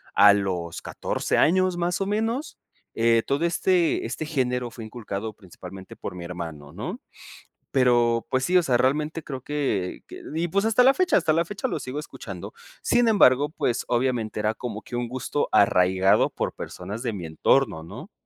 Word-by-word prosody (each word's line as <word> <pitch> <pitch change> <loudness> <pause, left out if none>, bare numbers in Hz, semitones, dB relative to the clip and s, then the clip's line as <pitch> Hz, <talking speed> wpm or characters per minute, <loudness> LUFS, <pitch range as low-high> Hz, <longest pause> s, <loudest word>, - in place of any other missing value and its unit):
a 100 0 +8
los 90 -4 -2
14 - - -2
años, 185 +2 +3
más 175 0 -1
o 195 - 0
menos 225 +8 -2 0.4
eh, 115 0 +3
todo 140 +4 0
este 175 0 +1
este 155 - -4
género 125 -5 -1
fue 115 -1 -9
inculcado 110 -2 -5
principalmente 95 -1 -11
por 90 - -6
mi 90 - -7
hermano, 80 -5 -7
¿no? 160 - -6 0.7
Pero 120 -3 +3
pues 130 0 +1
sí, 180 +4 +2
o 180 - +6
sea, 130 -6 +2
realmente 150 +5 0
creo 130 -3 -6
que 130 -11 -2
que - - -11
y 165 +2 0
pues 200 +5 +1
hasta 225 +2 +4
la 265 +2 +7
fecha 365 +4 +2
hasta 160 -3 +3
la 165 +2 +2
fecha 205 +7 -3
lo - - -3
sigo 130 +3 -5
escuchando. 150 - -8 0.3
Sin 240 -1 +3
embargo, 145 - +5
pues 125 -5 -1
obviamente 120 -3 0
era 105 +1 0
como 110 -2 -6
que 125 - -10
un 120 0 -2
gusto 130 +3 -2
arraigado 95 0 +4
por - - -3
personas 105 +4 -7
de 115 -4 -2
mi 90 -4 -6
entorno, 80 +3 +1
¿no? 80 - -10
125 Hz, 180 wpm, -25 LUFS, 105-165 Hz, 0.7 s, a